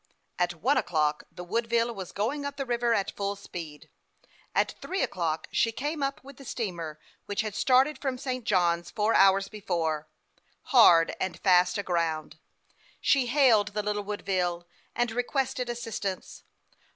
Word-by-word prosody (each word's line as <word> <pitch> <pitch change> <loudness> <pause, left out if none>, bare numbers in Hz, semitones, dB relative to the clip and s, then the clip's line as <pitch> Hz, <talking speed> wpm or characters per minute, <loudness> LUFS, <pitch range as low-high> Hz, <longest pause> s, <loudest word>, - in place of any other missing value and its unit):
At 175 -1 +1
one 255 - +1
o'clock 150 -2 0
the 180 - -9
Wooclville 230 +3 0
was 190 -4 -7
going 250 +9 -2
up 285 0 -4
the 275 - -2
river 240 -1 +1
at 200 -2 -1
full 200 0 -3
speed. 165 -6 -9 0.7
At - - +2
three 380 +1 -2
o'clock 160 -3 -2
she 230 - +2
came 295 +6 -3
up 275 -1 -2
with 275 -1 -13
the 275 - -12
steamer 170 - -4 0.3
which 205 +1 -1
had 215 -2 -4
started 265 +7 +3
from 265 -3 -2
St. 255 -1 -4
Johns 175 -4 +1
four 210 +3 +1
hours 195 0 +5
before, 165 -7 -2 0.7
hard 170 -9 +7
and 190 - -2
fast 180 +1 +4
aground. 165 -5 -2 0.6
She 270 -3 +3
hailed 235 -6 +4
the 210 - -1
little 205 0 -1
Woodville, 180 -4 -2 0.3
and 240 -1 0
requested 250 +1 -1
assistance. 225 -5 -5
205 Hz, 150 wpm, -28 LUFS, 175-245 Hz, 0.7 s, hard